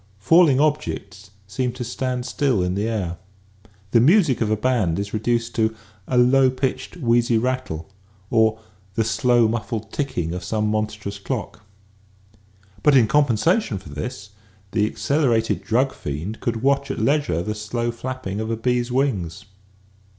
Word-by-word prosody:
Falling 145 - +5
objects 105 -10 -1 0.2
seem 120 +6 -2
to 125 0 -5
stand 125 +1 -3
still 130 -11 +1
in 90 0 -1
the 100 +3 -1
air. 95 -7 -2 0.7
The 115 - +5
music 150 - +4
of 110 - +1
a 110 - +1
band 105 -8 +1
is 100 0 -4
reduced 115 +2 0
to 110 0 +1 0.2
" - - -29
a 125 - 0
low 130 +2 +5
pitched, 130 +4 -3
wheezy 120 -4 +2
rattle 125 -9 -2 0.2
" 100 -1 -32
or 110 -1 +3 0.2
" 95 0 -32
the 115 - +2
slow 120 +1 +3
muffled 110 -1 -3
ticking 90 - -2
of 90 0 -5
some 105 +3 -1
monstrous 105 -2 -3
clock." 105 -1 -5 1.2
But 145 -2 +5
in 120 - +6
compensation 145 - +2
for 95 -5 -11
this 105 - -6 0.4
the 105 -1 +2
accelerated 120 -4 0
drug 130 +4 +1
fiend 80 +10 -5
could 115 -1 -2
watch 140 0 +2
at 135 - -3
leisure 140 - +1
the 105 - -2
slow 115 +3 -3
flapping 120 -4 -5
of 110 0 -3
a 115 - -1
bee's 120 +1 0
wings. 105 - -1
115 Hz, 160 wpm, -22 LUFS, 105-130 Hz, 1.2 s, in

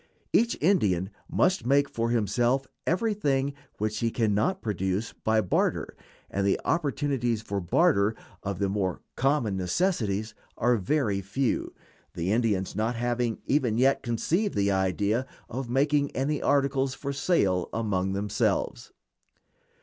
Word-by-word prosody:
Each 235 0 +3
Indian 105 - +2 0.2
must 185 -9 +2
make 140 +3 +3
for 115 -3 -2
himself 120 +4 +1 0.2
everything 155 -9 +1 0.2
which 110 0 -2
he 115 - +1
can 110 -2 +1
not 145 - 0
procure 95 -2 0 0.2
by 110 0 +3
barter, 90 - 0 0.4
and 100 - -1
the 100 - +2
opportunities 140 -8 0
for 100 -2 -3
barter 105 - +3 0.3
of 100 -2 -3
the 100 +1 0
more 95 -2 -1
common 130 -6 +1
necessities 110 - 0 0.2
are 120 +1 +3
very 105 -1 0
few, 115 +7 -1 0.4
the 85 +3 -1
Indians 105 -5 0
not 115 +3 0
having 120 -1 -1
even 130 -6 +1
yet 135 +3 +3
conceived 170 - 0
the 100 0 +2
idea 100 +6 0 0.2
of 125 +1 -5
making 140 +2 +2
any 140 +3 0
articles 135 -1 +1
for 140 0 -4
sale 135 - +1
among 95 -4 -1
themselves. 100 +1 -1
115 Hz, 135 wpm, -27 LUFS, 100-140 Hz, 0.4 s, Each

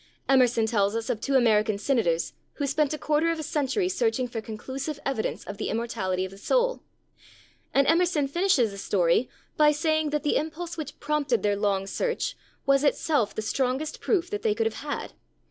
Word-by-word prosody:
Emerson 250 -4 +4
tells 205 -2 +1
us 230 +2 -1
of 220 -3 -4
two 275 - 0
American 220 -4 +3
senators 200 -8 0 0.2
who 285 - -2
spent 285 +1 +1
a 305 - -2
quarter 305 +2 +1
of 330 - 0
a 315 - -4
century 300 +6 0
searching 375 - 0
for 235 -2 -5
conclusive 265 +7 -5
evidence 265 -5 -2
of 200 - -7
the - - -3
immortality 200 -5 -1
of 190 - -8
the 195 - -13
soul. - - +1 0.9
And 275 - +3
Emerson 330 -2 +3
finishes 295 - +2
the 200 - -8
story 185 +4 +2 0.3
by 300 0 +6
saying 310 0 +1
that 300 0 -1
the 295 - +2
impulse 330 +2 -4
which 305 -3 -7
prompted 290 -5 0
their 205 -1 +2
long 200 -1 0
search 475 - -2 0.3
was 275 0 +4
itself 285 -7 +1
the 215 - -3
strongest 265 +6 -1
proof 370 -6 0
that 205 - -2
they 210 -1 +1
could 225 +1 0
have 225 -1 -2
had. 290 0 -4
270 Hz, 190 wpm, -26 LUFS, 220-305 Hz, 0.9 s, by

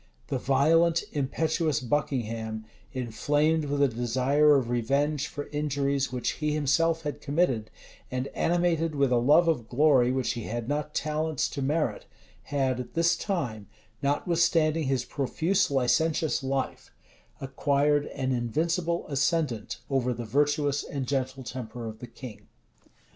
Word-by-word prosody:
The 135 - -1
violent, 160 +6 +3
impetuous 155 +1 0
Buckingham, 115 -5 -2 0.3
inflamed 145 +6 0
with 145 0 +1
a - - +5
desire 130 +5 +3
of 130 -4 +1
revenge 140 +5 0
for 145 - -6
injuries 140 -2 -1
which 125 -1 -1
he 150 0 +1
himself 160 +3 +1
had 145 -1 -4
committed, 140 -8 0 0.4
and 130 0 -2
animated 165 -2 +1
with 140 -2 +2
a 125 - +4
love 150 +8 +5
of 120 -9 0
glory 130 -2 +4
which 130 -1 0
he 115 -2 -5
had 120 0 -4
not 150 +1 -2
talents 155 0 -1
to 140 - -5
merit, 150 +4 -1 0.4
had 135 -3 0
at 125 -1 -7
this 170 +1 +3
time, 125 - -3 0.3
notwithstanding 160 +1 +2
his 130 -2 0
profuse 160 +9 0
licentious 150 +4 +1
life, 135 0 -3 0.5
acquired 140 +2 +1
an 130 -1 -3
invincible 165 +8 -1
ascendant 140 -5 0
over 125 -3 0
the 120 0 -5
virtuous 145 +3 +1
and 135 -3 -4
gentle 135 -1 -2
temper 120 -2 -6
of 110 0 -8
the 125 - -8
king. 110 -4 -11
140 Hz, 135 wpm, -27 LUFS, 125-155 Hz, 0.5 s, a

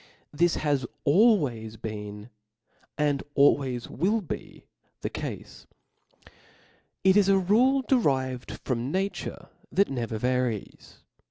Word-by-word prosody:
This 170 +3 +2
has 145 -4 0 0.2
al 210 +10 +6
ways 115 - -4
been 105 0 -7 0.7
and 145 -2 +1
always 135 -4 +3
will 210 +6 0
be 180 - -8 0.4
the - - -3
cale. - - -5 1.6
It 190 0 +5
is 205 -2 +5
^ 190 -2 +3
rule 260 +5 +4
derived 130 - 0
from 125 +1 -2
nature 195 +3 -3 0.2
that 200 -5 +2
never 120 -4 -3
varies. 125 -2 -3
140 Hz, 110 wpm, -27 LUFS, 120-190 Hz, 1.6 s, al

